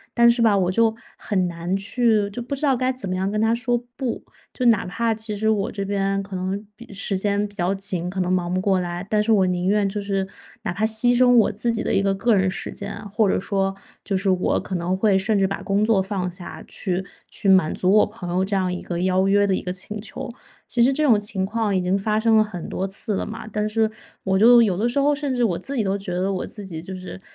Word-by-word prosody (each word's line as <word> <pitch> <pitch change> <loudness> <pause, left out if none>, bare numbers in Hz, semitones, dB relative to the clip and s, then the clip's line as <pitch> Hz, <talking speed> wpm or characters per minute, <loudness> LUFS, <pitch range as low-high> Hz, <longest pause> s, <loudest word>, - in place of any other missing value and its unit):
但 235 0 +6
是 235 0 +2
吧， 215 -3 +4
我 185 -1 +1
就 225 +2 +2 0.2
很 185 -3 0
难 170 +2 -3
去 215 +1 +1
就 240 - -5
不 255 +4 -4
知 275 - -6
道 275 -3 +3
该 255 +1 0
怎 255 -6 -6
么 185 - -1
样 190 +1 -1
跟 210 +1 -1
他 225 +1 +3
说 240 +1 0 0.2
不。 260 -4 -3 0.3
就 255 - -2
哪 225 -4 +4
怕 230 +5 0
其 220 -1 -5
实 220 +2 0
我 215 0 +1
这 200 -4 -4
边 195 0 -1
可 195 0 -11
能 190 +3 -3
比 240 - -13
时 200 0 -2
间 205 +1 0
比 205 - -9
较 190 -1 0
紧， 190 -3 -3
可 190 +1 -2
能 180 0 -1
忙 180 -1 0
不 185 - 0
过 190 -1 +2
来， 175 +1 -4
但 210 -1 +2
是 210 - -3
我 205 -4 +5
宁 180 0 -1
愿 205 0 +2
就 205 +1 -3
是 195 -1 -1 0.4
哪 215 - -2
怕 215 +5 0
牺 220 +2 +1
牲 255 0 +5
我 225 - +5
自 215 +3 -2
己 225 - -2
的 - - -1
一 - - +3
个 195 0 +1
个 230 +4 +2
人 190 -2 +3
时 - - -5
间 200 - -6
啊， - - -9
或 215 -1 +3
者 - - +2
说 195 0 -1 0.3
就 200 - -1
是 195 +1 0
我 185 -1 +1
可 190 - -5
能 175 +1 -1
会 195 0 +3
甚 205 +2 +1
至 195 - +3
把 195 +1 -3
工 200 0 +1
作 215 -3 +3
放 190 -2 -3
下， 180 0 -9
去 185 -1 -2 0.3
去 200 - -2
满 185 -5 +4
足 185 - +1
我 210 +1 +6
朋 205 -5 -8
友 185 +1 +1
这 200 +1 -1
样 185 -2 0
一 180 - -5
个 175 -1 -4
邀 185 +1 +2
约 205 +1 +4
的 195 - +1
一 - - -1
个 180 - -4
请 200 +3 -5
求。 215 - -7 0.4
其 240 - 0
实 260 +3 +5
这 305 +3 0
种 235 -8 +5
情 205 -2 -2
况 215 0 -1
已 185 - +2
经 180 +2 +1
发 210 +2 0
生 220 0 +4
了 215 - +6
很 200 -5 -7
多 190 - -2
次 195 +2 -3
了 - - -2
嘛， 220 0 -7
但 210 0 -1
是 220 0 +1 0.3
我 190 0 +1
就 240 +3 +8
有 200 -6 +2
的 220 +4 +1
时 240 - -2
候 285 +1 +3
甚 285 -2 -2
至 245 - +1
我 185 -7 +1
自 280 - -6
己 230 - +1
都 195 0 0
觉 195 -3 -6
得 185 +2 0
我 185 - -2
自 210 - -8
己 165 -4 -6
就 190 +3 -7
是 185 +1 -8
200 Hz, 295 characters per minute, -22 LUFS, 190-220 Hz, 0.4 s, 就